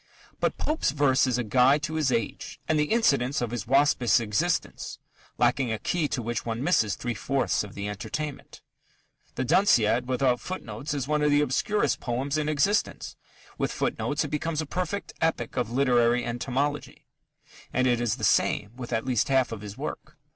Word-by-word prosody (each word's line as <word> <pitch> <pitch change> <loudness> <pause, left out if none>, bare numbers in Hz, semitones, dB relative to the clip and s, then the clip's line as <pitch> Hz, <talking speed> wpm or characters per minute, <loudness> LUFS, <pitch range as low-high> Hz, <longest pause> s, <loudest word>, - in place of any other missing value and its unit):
But - - 0
Pope's 310 +1 0
verse 135 -2 +3
is 125 -2 +1
a 125 - -1
guide 130 +6 +3
to 150 +1 -3
his 155 -4 +1
age 115 -4 -3
and 155 -1 +2
the 150 - +3
incidents 140 - +2
of 120 -2 -2
his 120 -4 -4
waspish 135 -5 +4
existence, 120 +11 -1 0.4
lacking 120 0 +2
a 110 - -1
key 165 +6 -1
to 125 - -3
which 120 -1 -2
one 115 +2 -3
misses 110 - +2
three 120 -1 -3
fourths 135 +3 0
of 105 - -10
the 100 0 -4
entertainment. 140 +8 -6 0.7
The 130 - -1
Danciad 125 - +3
without 130 -1 +1
footnotes 145 - -5
is 135 -2 -3
one 150 0 +1
of 150 - +3
the 145 0 +4
obscurest 175 +9 0
poems 130 +4 -2
in 150 0 -1
existence: 175 +8 0 0.4
with - - 0
footnotes - - -1
it - - -5
becomes 155 +1 -2
a 155 - -1
perfect 185 +5 -4
epic 160 -8 0
of 120 - -1
literary 120 -1 +2
entomology. 135 +4 -3 0.7
And 130 +1 +1
it 120 -2 +2
is 115 -2 0
the 120 - -10
same 105 - +2
with 125 -1 -8
at 115 0 -1
least 125 -4 +1
half 130 -3 +2
of 110 -3 -6
his 105 -1 -8
work. - - -6
130 Hz, 185 wpm, -26 LUFS, 120-150 Hz, 0.7 s, waspish